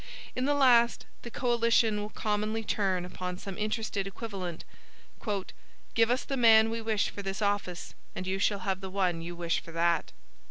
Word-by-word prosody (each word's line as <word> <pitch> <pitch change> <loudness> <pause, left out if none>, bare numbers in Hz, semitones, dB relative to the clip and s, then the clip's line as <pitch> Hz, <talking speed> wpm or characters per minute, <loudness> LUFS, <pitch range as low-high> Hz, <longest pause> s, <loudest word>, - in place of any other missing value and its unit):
In 255 - 0
the 290 +1 +2
last, 240 -4 +4 0.2
the 240 - -7
coalition 230 -3 +2
will 210 - -5
commonly 215 +1 -1
turn 190 -4 0
upon 180 0 -5
some 195 0 -7
interested 215 -1 -2
equivalent: 195 -5 -6 1.3
"Give 230 0 +4
us 250 +2 +1
the 275 - -3
man 225 -2 +6
we 230 0 -3
wish 220 -2 0
for 200 - -6
this 195 0 -4
office, 200 -4 -1 0.2
and 185 - -4
you 190 +1 -1
shall 200 -1 +1
have 190 -1 -1
the 190 - -5
one 185 -3 0
you 170 +1 -6
wish 170 -1 0
for 165 - -12
that." 170 0 +1
205 Hz, 175 wpm, -29 LUFS, 185-225 Hz, 1.3 s, man